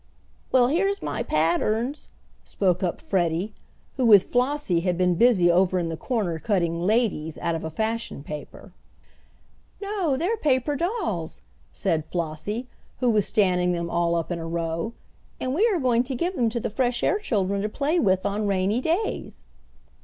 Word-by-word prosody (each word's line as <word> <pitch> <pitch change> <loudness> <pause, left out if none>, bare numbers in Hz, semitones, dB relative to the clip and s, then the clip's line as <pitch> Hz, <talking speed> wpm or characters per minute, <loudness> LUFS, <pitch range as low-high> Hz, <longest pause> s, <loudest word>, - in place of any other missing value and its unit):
"Well, 250 -1 +5
here's 390 +6 0
my - - -2
patterns," 215 - 0 0.3
spoke 180 -3 0
up 180 -3 -1
Freddie, 180 +2 0 0.4
who 255 - +1
with 205 -4 +8
Flossie 250 -7 +1
had 175 0 -1
been 180 0 +3
busy 185 -3 +4
over 185 +1 +3
in 170 -2 -1
the 165 - -3
corner 190 -5 -2
cutting 170 -4 0
"ladies" 185 -6 0
out 170 - -1
of 165 - -4
a 160 - -3
fashion 220 -3 -3
paper. 150 0 -9 1.1
"No, 395 -9 -1
they're 375 +10 0
paper 290 - +1
dolls," 280 - -2 0.3
said 155 - -1
Flossie, 170 +9 -4 0.3
who 250 -2 +3
was 210 -3 +2
standing 180 -3 +2
them 170 -1 -3
all 170 0 +1
up 165 +1 -2
in 170 - -2
a 165 - -5
row, 165 +5 -2 0.5
"and 255 - -2
we 405 +10 +3
are 395 -7 +1
going 245 -4 +3
to 260 0 -3
give 350 +8 -1
them 240 -6 +2
to 235 +1 -2
the 215 - -3
fresh 245 +1 0
air 410 - +2
children 200 - 0
to 210 - -1
play 295 +9 0
with 190 - +2
on 205 +1 -1
rainy 200 +4 +1
days." 345 +9 -2
205 Hz, 170 wpm, -25 LUFS, 170-255 Hz, 1.1 s, with